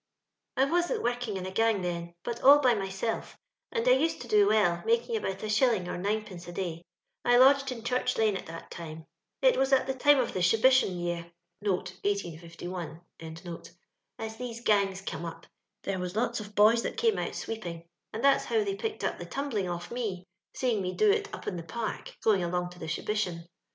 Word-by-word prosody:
" -, -, -55 dB
I 265 Hz, -, +5 dB
wasn't 350 Hz, -, 0 dB
working 240 Hz, -4 st, -1 dB
in 185 Hz, -, -5 dB
a 185 Hz, -, -4 dB
gang 225 Hz, -1 st, +2 dB
then, 170 Hz, -1 st, -4 dB
but 235 Hz, 0 st, -4 dB
all 280 Hz, +2 st, +9 dB
by 260 Hz, -4 st, +4 dB
myself, 195 Hz, +2 st, -3 dB, 0.3 s
and 465 Hz, +1 st, -1 dB
I -, -, +7 dB
used 325 Hz, -10 st, +2 dB
to 240 Hz, -, -8 dB
do 210 Hz, -3 st, +5 dB
well, 200 Hz, -5 st, +3 dB
making 465 Hz, 0 st, +1 dB
about 195 Hz, -, -3 dB
a -, -, -2 dB
shilling 215 Hz, -3 st, +2 dB
or -, -, -3 dB
ninepenee 195 Hz, -2 st, -3 dB
a -, -, -6 dB
day. 175 Hz, -2 st, -4 dB, 0.4 s
I 245 Hz, 0 st, +5 dB
lodged 275 Hz, +1 st, +6 dB
in 230 Hz, -3 st, -6 dB
Church 250 Hz, +1 st, 0 dB
lane 215 Hz, -2 st, +3 dB
at -, -, -6 dB
that 165 Hz, +1 st, -9 dB
time. 160 Hz, -1 st, -8 dB, 0.4 s
It -, -, +5 dB
was 270 Hz, +1 st, +2 dB
at 265 Hz, -1 st, +4 dB
the 265 Hz, -, -1 dB
time 290 Hz, +2 st, +5 dB
of 250 Hz, -3 st, 0 dB
the -, -, -2 dB
Shibition 220 Hz, 0 st, +4 dB
year 170 Hz, -1 st, -3 dB, 0.3 s
(1631) 180 Hz, -3 st, -3 dB, 1.2 s
aa 225 Hz, -, -3 dB
these 235 Hz, -2 st, -5 dB
gangs 200 Hz, -4 st, +2 dB
come 185 Hz, -, -5 dB
up. 170 Hz, -, -7 dB, 0.4 s
There 195 Hz, -1 st, -2 dB
was 180 Hz, +1 st, -4 dB
lots 235 Hz, +1 st, 0 dB
of 205 Hz, -1 st, -9 dB
boys 220 Hz, +3 st, +6 dB
that -, -, -3 dB
oame 455 Hz, -1 st, +1 dB
out -, -, -7 dB
sweeping, 175 Hz, -7 st, -5 dB, 0.2 s
and 225 Hz, -, -5 dB
that's 275 Hz, 0 st, +4 dB
how 445 Hz, -2 st, +1 dB
they 400 Hz, -1 st, -2 dB
picked 440 Hz, +2 st, -4 dB
up -, -, -1 dB
the -, -, -7 dB
tumbling 240 Hz, -10 st, -2 dB
off 175 Hz, 0 st, -5 dB
me, 210 Hz, -7 st, -3 dB, 0.3 s
seeing 240 Hz, -6 st, +1 dB
me 185 Hz, 0 st, -3 dB
do 430 Hz, -1 st, +5 dB
it 420 Hz, 0 st, -1 dB
up -, -, -8 dB
in 180 Hz, -, -3 dB
the -, -, -4 dB
Park, 215 Hz, +7 st, -5 dB
going 200 Hz, -5 st, +3 dB
along 175 Hz, +1 st, -1 dB
to 180 Hz, -, -13 dB
the 160 Hz, -, -6 dB
Shibition. 175 Hz, 0 st, -2 dB
210 Hz, 205 wpm, -29 LUFS, 180-255 Hz, 1.2 s, all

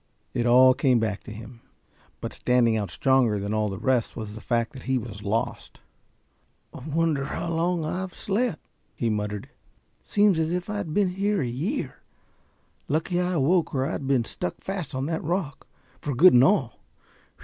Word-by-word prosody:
It 120 Hz, 0 st, 0 dB
all 130 Hz, +2 st, +7 dB
came 130 Hz, -1 st, +3 dB
back 110 Hz, -3 st, -1 dB
to -, -, -8 dB
him 115 Hz, +2 st, -10 dB, 0.6 s
but -, -, -5 dB
standing 120 Hz, -2 st, +2 dB
out 105 Hz, -4 st, -2 dB
stronger 120 Hz, +5 st, +2 dB
than 100 Hz, +2 st, -3 dB
all 105 Hz, -1 st, +1 dB
the 95 Hz, -, -5 dB
rest 125 Hz, +1 st, 0 dB
was 110 Hz, -3 st, -6 dB
the 110 Hz, -, -9 dB
fact 115 Hz, -1 st, -1 dB
that 130 Hz, -, -9 dB
he 130 Hz, -, +3 dB
was 110 Hz, -4 st, -6 dB
lost. 105 Hz, +3 st, -3 dB, 0.9 s
"Wonder 155 Hz, 0 st, -1 dB
how 165 Hz, +4 st, -3 dB
long 170 Hz, 0 st, 0 dB
I've 185 Hz, +4 st, -4 dB
slept," 205 Hz, -3 st, -1 dB, 0.3 s
he 115 Hz, -2 st, 0 dB
muttered. 105 Hz, -1 st, -3 dB, 0.5 s
"Seems 205 Hz, -4 st, +3 dB
as 160 Hz, +1 st, 0 dB
if 180 Hz, +3 st, -3 dB
I 210 Hz, -, -2 dB
had 190 Hz, -6 st, -4 dB
been 200 Hz, -3 st, +3 dB
here 200 Hz, +1 st, 0 dB
a -, -, -2 dB
year. 165 Hz, -, -3 dB, 0.9 s
Lucky 160 Hz, +4 st, 0 dB
I 180 Hz, 0 st, 0 dB
awoke 165 Hz, +2 st, +2 dB
or 130 Hz, 0 st, +1 dB
I'd 140 Hz, -2 st, -3 dB
been 130 Hz, -4 st, +2 dB
stuck 90 Hz, -, -4 dB
fast 190 Hz, -8 st, -5 dB
on 130 Hz, +1 st, -1 dB
that 160 Hz, +1 st, -2 dB
rock, 165 Hz, -3 st, -3 dB, 0.3 s
for 145 Hz, -3 st, -3 dB
good 180 Hz, +9 st, +7 dB
and 125 Hz, 0 st, +7 dB
all. 135 Hz, -, +2 dB
135 Hz, 180 wpm, -25 LUFS, 115-175 Hz, 0.9 s, all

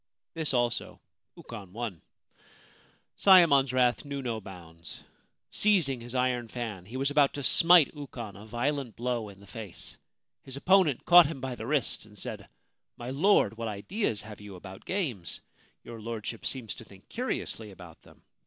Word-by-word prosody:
This 160 Hz, -2 st, -2 dB
also 120 Hz, -2 st, -1 dB, 0.4 s
Ukon 95 Hz, -3 st, -10 dB
won. 110 Hz, -7 st, -5 dB, 1.2 s
Sayemon's 160 Hz, -9 st, +6 dB
wrath 125 Hz, -1 st, +2 dB
knew 140 Hz, -2 st, -5 dB
no 115 Hz, -3 st, -3 dB
bounds. 85 Hz, -4 st, -11 dB, 0.5 s
Seizing 165 Hz, -, +3 dB
his 120 Hz, +2 st, -8 dB
iron 125 Hz, -2 st, +1 dB
fan, 110 Hz, -6 st, -5 dB
he 120 Hz, +5 st, -6 dB
was 135 Hz, +2 st, +1 dB
about 145 Hz, -1 st, +3 dB
to 145 Hz, -, -4 dB
smite 165 Hz, +1 st, +6 dB
Ukon 125 Hz, -8 st, -8 dB
a 105 Hz, +2 st, -12 dB
violent 125 Hz, +2 st, -2 dB
blow 120 Hz, -3 st, -2 dB
in 100 Hz, -1 st, -14 dB
the 100 Hz, -, -15 dB
face. 105 Hz, -3 st, -8 dB, 0.4 s
His 135 Hz, 0 st, -8 dB
opponent 180 Hz, -4 st, +3 dB
caught 175 Hz, -2 st, +9 dB
him 150 Hz, -3 st, -6 dB
by 130 Hz, 0 st, -4 dB
the 115 Hz, -1 st, -7 dB
wrist, 140 Hz, -6 st, 0 dB
and 105 Hz, -1 st, -17 dB
said: -, -, -7 dB, 0.2 s
* -, -, -56 dB
My 120 Hz, +1 st, -6 dB
Lord, 140 Hz, -, +3 dB
what 115 Hz, -1 st, -3 dB
ideas 110 Hz, -, -2 dB
have 105 Hz, -1 st, -10 dB
you 105 Hz, -2 st, -9 dB
about 95 Hz, +1 st, -11 dB
games? 135 Hz, -, -3 dB, 0.4 s
Your 115 Hz, -1 st, -9 dB
Lordship 115 Hz, 0 st, -5 dB
seems 125 Hz, -5 st, -3 dB
to -, -, -11 dB
think 95 Hz, -1 st, -17 dB
curiously 225 Hz, -, -3 dB
about 90 Hz, -4 st, -13 dB
them -, -, -20 dB
120 Hz, 165 wpm, -29 LUFS, 105-140 Hz, 1.2 s, caught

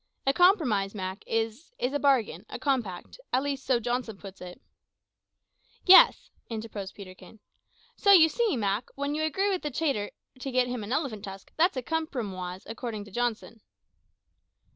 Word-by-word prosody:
"A 270 Hz, -, +3 dB
compromise, 265 Hz, -, +3 dB
Mak, 190 Hz, 0 st, -5 dB
is 225 Hz, -, -2 dB
is 255 Hz, +2 st, -1 dB
a 290 Hz, -, 0 dB
bargain, 270 Hz, -6 st, +2 dB
a -, -, -5 dB
compact 245 Hz, -, -2 dB
at 255 Hz, +2 st, +2 dB
least 280 Hz, -2 st, -3 dB
so 255 Hz, -3 st, +2 dB
Johnson 240 Hz, -2 st, -3 dB
puts 195 Hz, 0 st, -11 dB
it 180 Hz, 0 st, -9 dB, 0.7 s
" -, -, -39 dB
"Yes," -, -, +6 dB, 0.2 s
interposed 215 Hz, -4 st, -6 dB
Peterkin; 195 Hz, +2 st, -12 dB, 0.6 s
"so 400 Hz, -, +4 dB
you 340 Hz, -5 st, +9 dB
see, 440 Hz, -, 0 dB
Mak, 205 Hz, +1 st, -1 dB
when 280 Hz, +1 st, -2 dB
you 310 Hz, -, -1 dB
agree 385 Hz, +6 st, +1 dB
with 370 Hz, -5 st, -2 dB
a 300 Hz, -, -1 dB
trader 270 Hz, -8 st, -1 dB, 0.3 s
to 270 Hz, +1 st, -5 dB
get 255 Hz, 0 st, +3 dB
him 245 Hz, -3 st, -4 dB
an 205 Hz, -, -7 dB
elephant 255 Hz, -8 st, -2 dB
tusk, 195 Hz, 0 st, -10 dB
that's 335 Hz, -2 st, +2 dB
a 255 Hz, -, -2 dB
cumprumoise, 205 Hz, -, -4 dB
according 225 Hz, -2 st, -6 dB
to 205 Hz, -, -14 dB
Johnson." 230 Hz, 0 st, -3 dB
245 Hz, 165 wpm, -28 LUFS, 205-290 Hz, 0.7 s, you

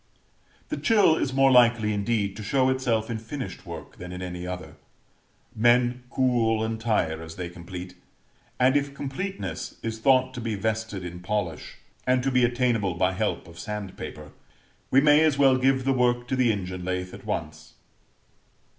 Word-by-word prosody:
The -, -, -2 dB
chill 205 Hz, -8 st, +4 dB
is 140 Hz, -, -1 dB
more 135 Hz, 0 st, +4 dB
likely, 120 Hz, -3 st, +5 dB
indeed, 100 Hz, -1 st, -1 dB
to -, -, -7 dB
show 130 Hz, +4 st, +2 dB
itself 120 Hz, -4 st, 0 dB
in 110 Hz, -, -3 dB
finished 125 Hz, +4 st, -7 dB
work -, -, -9 dB
than 90 Hz, 0 st, -8 dB
in 90 Hz, 0 st, -6 dB
any 90 Hz, 0 st, -5 dB
other 85 Hz, -4 st, -7 dB, 0.8 s
men 120 Hz, +2 st, +3 dB
cool 120 Hz, -4 st, +2 dB
and 110 Hz, 0 st, -3 dB
tire 85 Hz, -8 st, 0 dB
as 80 Hz, 0 st, -9 dB
they 90 Hz, -2 st, -5 dB
complete: 90 Hz, +1 st, -8 dB, 0.7 s
and 130 Hz, +2 st, +4 dB
if 140 Hz, -1 st, 0 dB
completeness 135 Hz, -, -5 dB
is 115 Hz, -1 st, -3 dB
thought 130 Hz, +1 st, +3 dB
to 125 Hz, -, -6 dB
be 115 Hz, -2 st, -2 dB
vested 110 Hz, -2 st, -2 dB
in 90 Hz, 0 st, -7 dB
polish, 90 Hz, -4 st, -3 dB, 0.3 s
and 125 Hz, 0 st, +3 dB
to 135 Hz, -, +1 dB
be 125 Hz, -1 st, +3 dB
attainable 120 Hz, -6 st, +1 dB
by 90 Hz, +2 st, +2 dB
help 95 Hz, -3 st, -2 dB
of 85 Hz, 0 st, -13 dB
sand 105 Hz, +1 st, -5 dB
paper, -, -, -8 dB, 0.6 s
we 135 Hz, -, +5 dB
may 150 Hz, +1 st, +6 dB
as 155 Hz, -3 st, +3 dB
well 135 Hz, -2 st, +5 dB
give 130 Hz, 0 st, +2 dB
the 135 Hz, -, +3 dB
work 120 Hz, -1 st, +1 dB
to 130 Hz, -, +1 dB
the 125 Hz, -3 st, +3 dB
engine 90 Hz, -3 st, -4 dB
lathe 90 Hz, 0 st, -3 dB
at -, -, -10 dB
once. -, -, -5 dB
115 Hz, 175 wpm, -26 LUFS, 95-130 Hz, 0.8 s, may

